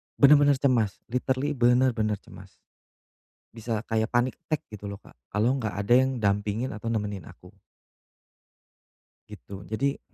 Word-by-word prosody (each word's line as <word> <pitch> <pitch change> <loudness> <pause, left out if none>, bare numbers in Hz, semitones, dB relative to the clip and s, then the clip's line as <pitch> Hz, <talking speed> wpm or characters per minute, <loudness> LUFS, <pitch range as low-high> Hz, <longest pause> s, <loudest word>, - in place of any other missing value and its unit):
Benar-benar 145 0 +6
cemas, 125 -7 0
literally 130 +3 0
benar-benar 120 -4 +2
cemas. - - -13 1.1
Bisa 115 -1 -3
kayak 110 0 0
panic 120 +1 +1
attack, 155 -2 -3
gitu, 105 -1 -8
loh, 100 - -8
Kak, - - -19 0.2
kalo 110 +6 +2
gak 110 -3 -3
ada 100 +4 +2
yang 130 -1 +2
dampingin 105 +4 0
atau 115 +2 -4
nemenin 105 -4 -3
aku. - - -15 1.8
Gitu, 100 -2 -10
jadi 135 +6 -1
115 Hz, 130 wpm, -26 LUFS, 105-130 Hz, 1.8 s, Benar-benar